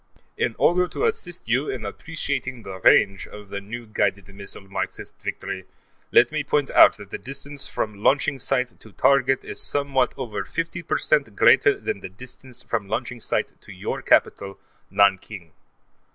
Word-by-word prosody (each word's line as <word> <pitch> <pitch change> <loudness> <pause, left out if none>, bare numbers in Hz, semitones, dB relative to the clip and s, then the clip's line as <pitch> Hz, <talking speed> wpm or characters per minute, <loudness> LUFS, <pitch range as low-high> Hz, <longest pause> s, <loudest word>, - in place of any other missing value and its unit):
In 115 - -1
order 180 +1 +3
to 445 - -2
assist 180 - -3
you 125 +6 +1
in 120 -5 -4
appreciating 130 0 -4
the 95 -1 -8
range 100 +1 +4
of 105 -1 -12
the 100 0 -5
new 120 +4 -7
guided 100 -3 -1
missile 100 0 -8
Marxist 95 - -5
Victory, 95 -1 -5 0.5
let 120 - +5
me 155 -1 -1
point 145 0 0
out - - +7
that 100 0 -12
the - - -5
distance 140 +1 -5
from 105 -2 -4
launching 140 0 +2
site 125 -3 -1
to 110 - -14
target 135 -1 +3
is - - -3
somewhat 140 -3 +1
over 110 -4 -4
50 165 +1 -4
percent 140 -8 0
greater - - +5
than - - -3
the 95 - -8
distance 125 +5 -12
from 110 -4 -2
launching 120 +3 -3
site - - -1
to - - -11
your - - -4
capital, 100 0 +2 0.3
Nanking. 95 -3 +1
120 Hz, 165 wpm, -24 LUFS, 100-140 Hz, 0.5 s, out